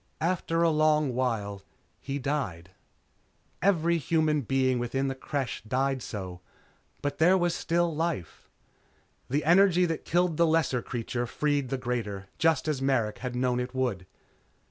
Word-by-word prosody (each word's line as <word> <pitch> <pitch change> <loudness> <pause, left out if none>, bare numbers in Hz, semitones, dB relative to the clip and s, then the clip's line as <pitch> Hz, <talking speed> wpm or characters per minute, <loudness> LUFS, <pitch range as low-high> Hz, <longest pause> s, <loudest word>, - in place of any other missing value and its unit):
After 170 -1 0
a 165 - +4
long 155 -3 +3
while, 110 -6 -1 0.4
he 140 0 -4
died. 125 - -3 0.9
Every 170 -3 +2
human 155 -1 +1
being 130 0 +1
within 135 +3 -1
the - - -2
Creche 130 -1 -3
died 135 +2 0
so, 90 -5 -6 0.6
but 145 0 -2
there 180 +4 +5
was 175 -2 +1
still 170 -1 0
life. 160 - -3 0.8
The 145 +4 0
energy 180 +1 +5
that 165 -2 -3
killed 175 -1 +1
the 170 - +4
lesser 160 -6 +2
creature 120 0 -3
freed 145 0 0
the 135 - -1
greater 105 -6 -4
just 160 -2 +2
as 150 -4 -1
Merrick 125 -6 0
had 125 -1 -4
known 125 0 +1
it 125 +1 -4
would. 115 -8 -1
135 Hz, 145 wpm, -28 LUFS, 125-160 Hz, 0.9 s, there